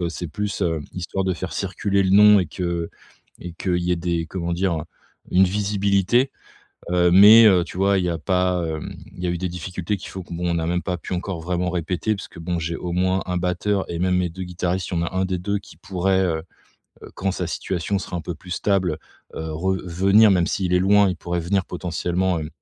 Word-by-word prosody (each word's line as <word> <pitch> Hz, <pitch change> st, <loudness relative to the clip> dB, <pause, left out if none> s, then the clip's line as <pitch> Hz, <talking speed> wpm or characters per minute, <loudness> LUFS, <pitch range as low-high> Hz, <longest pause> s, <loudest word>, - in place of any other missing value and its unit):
heu, 85 Hz, -, -1 dB
c'est 85 Hz, +1 st, -5 dB
plus, 105 Hz, +6 st, -4 dB
heu, 80 Hz, -3 st, 0 dB
histoire 95 Hz, +2 st, -3 dB
de 95 Hz, -, +1 dB
faire 90 Hz, -1 st, -6 dB
circuler 100 Hz, +2 st, 0 dB
le 95 Hz, -, +1 dB
nom 105 Hz, +1 st, +7 dB
et 90 Hz, -, -2 dB
que 85 Hz, 0 st, -3 dB, 0.5 s
et 90 Hz, -, -7 dB
qu'il 90 Hz, 0 st, -1 dB
y 90 Hz, 0 st, +1 dB
ait -, -, +1 dB
des, 85 Hz, -1 st, -2 dB
comment 85 Hz, 0 st, -3 dB
dire? 85 Hz, -3 st, -1 dB, 0.5 s
Une 95 Hz, +1 st, +5 dB
visibilité, 100 Hz, +5 st, +1 dB, 0.6 s
heu, 90 Hz, 0 st, +3 dB
mais, 105 Hz, +5 st, +9 dB
heu, 90 Hz, -4 st, +5 dB
tu 90 Hz, -, -9 dB
vois, 100 Hz, +1 st, +3 dB
il 90 Hz, -, 0 dB
y 90 Hz, -, 0 dB
a 85 Hz, -, -2 dB
pas, 90 Hz, 0 st, +1 dB
hem, 80 Hz, -1 st, -5 dB, 0.2 s
il 90 Hz, -, -8 dB
y -, -, +1 dB
a 85 Hz, -, 0 dB
eu 85 Hz, -, -2 dB
des 90 Hz, +1 st, -2 dB
difficultés 90 Hz, +3 st, -4 dB
qu'il 95 Hz, -, -9 dB
faut 95 Hz, -, -6 dB
que 85 Hz, -, -9 dB
bon, 90 Hz, +1 st, -2 dB
on -, -, 0 dB
n'a 80 Hz, -1 st, -1 dB
même 90 Hz, +1 st, 0 dB
pas 90 Hz, -1 st, -3 dB
pu 90 Hz, -, -5 dB
encore 90 Hz, -1 st, -4 dB
vraiment 90 Hz, +1 st, -1 dB
répéter 90 Hz, +5 st, -1 dB
puisque 95 Hz, -, -10 dB
bon, 85 Hz, +1 st, -3 dB
j'ai 85 Hz, 0 st, -3 dB
au 90 Hz, -1 st, -5 dB
moins 95 Hz, +1 st, +1 dB
1 90 Hz, 0 st, -1 dB
batteur 90 Hz, +3 st, -1 dB
et 85 Hz, -, -3 dB
même 90 Hz, +1 st, +1 dB
mes 90 Hz, -, 0 dB
2 95 Hz, +3 st, -8 dB
guitaristes, 90 Hz, 0 st, -2 dB
il 85 Hz, -, 0 dB
y -, -, 0 dB
en 85 Hz, -, -3 dB
1 95 Hz, 0 st, 0 dB
des 95 Hz, -1 st, -2 dB
2 100 Hz, +3 st, -1 dB
qui 95 Hz, -, -16 dB
pourrait 95 Hz, -1 st, 0 dB
heu, 80 Hz, -2 st, -1 dB, 0.6 s
heu, -, -, -10 dB
quand 95 Hz, +1 st, -1 dB
sa 90 Hz, -1 st, -3 dB
situation 95 Hz, +3 st, -2 dB
sera 90 Hz, -, -5 dB
un 85 Hz, -, -4 dB
peu 85 Hz, -, -5 dB
plus 90 Hz, +3 st, -9 dB
stable, 90 Hz, -4 st, 0 dB, 0.4 s
heu, 80 Hz, 0 st, -5 dB
re 95 Hz, +5 st, 0 dB
venir 100 Hz, +5 st, +4 dB
même 90 Hz, -3 st, +3 dB
s'il 95 Hz, -3 st, -1 dB
est 90 Hz, -, +4 dB
loin. 100 Hz, +1 st, +4 dB
Il 90 Hz, -, -4 dB
pourrait 85 Hz, 0 st, -3 dB
venir 95 Hz, +3 st, 0 dB
potentiellement, 90 Hz, +1 st, -1 dB
hem, 75 Hz, -1 st, -5 dB
90 Hz, 240 wpm, -22 LUFS, 85-95 Hz, 0.6 s, mais